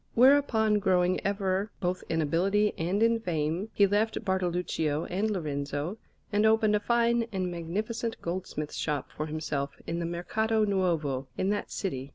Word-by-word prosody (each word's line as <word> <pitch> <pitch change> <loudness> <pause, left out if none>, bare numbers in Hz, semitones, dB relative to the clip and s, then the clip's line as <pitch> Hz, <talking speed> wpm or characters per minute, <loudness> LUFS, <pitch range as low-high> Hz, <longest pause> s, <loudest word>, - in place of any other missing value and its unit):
Whereupon, 235 -5 +5
growing 185 -2 +2
ever 195 0 0
both 180 0 -1
in 160 -1 +1
ability 195 +7 +2
and 185 +6 0
in 230 0 +3
fame, 170 0 -2
he 200 - +4
left 210 +3 0
Bartoluccio 175 -5 0
and 200 +5 -1
Lorenzo, 150 0 -3 0.3
and 205 +1 +3
opened 220 -1 +4
a - - +2
fine 235 +1 +2
and 185 -2 -2
magnificent 215 +7 -3
goldsmith's 170 -4 -4
shop 150 -4 -2
for 155 - -3
himself 150 -3 -3
in 170 +1 -3
the 170 - -2
Mercato 220 +6 0
Nuovo 165 -9 0
in 190 - 0
that 205 0 -1
city. 135 -9 -4
185 Hz, 155 wpm, -29 LUFS, 165-215 Hz, 0.3 s, Whereupon